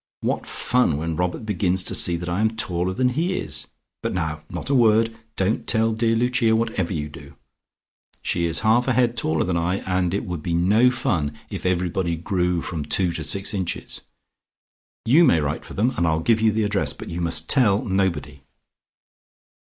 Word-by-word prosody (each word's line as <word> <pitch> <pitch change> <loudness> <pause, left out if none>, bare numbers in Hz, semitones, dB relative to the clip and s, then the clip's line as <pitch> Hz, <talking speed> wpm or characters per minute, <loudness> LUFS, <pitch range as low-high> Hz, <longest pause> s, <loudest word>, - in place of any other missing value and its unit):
What - - -2
fun 125 -12 +1
when 80 +1 -3
Robert 90 +6 -2
begins 95 -3 0
to - - 0
see 85 -1 +4
that 85 +1 -6
I 90 +3 -1
am 110 - +3
taller 90 -4 -1
than 125 +6 +1
he 170 +8 -1
is! - - -3 0.3
But - - -3
now 80 -3 -2
not - - -4
a - - +2
word! 115 -2 +3 0.2
Don't 95 +4 -1
tell 115 0 +2
dear 115 +1 +1
Lucia 120 -1 +2
whatever 110 -6 -1
you 75 -4 -3
do. 75 -2 -13 0.9
She 85 -1 0
is 80 -1 0
half 115 +3 +3
a 130 - +2
head 120 -1 +2
taller 80 -8 +1
than 90 -1 -1
I, 85 +2 0
and 90 -1 0
it - - -2
would 90 -4 -5
be 85 +2 -2
no 105 +9 +4
fun 100 - -1
if - - -3
everybody 90 -1 0
grew 90 0 -1
from 80 -4 -4
two 85 +4 +1
to - - -4
six 100 +1 -1
inches. 95 -4 -4 1.0
You 140 +9 +5
may 85 - +4
write 75 +1 -2
for - - -11
them, 115 +6 +2
and 85 - +1
I'll 80 0 +1
give 110 +4 +2
you 110 -1 +4
the 110 +1 0
address, 100 -1 0
but - - -9
you 85 +1 -4
must 80 -1 0
tell 105 -7 +3
nobody." 85 -8 -1
95 Hz, 195 wpm, -23 LUFS, 85-115 Hz, 1.0 s, You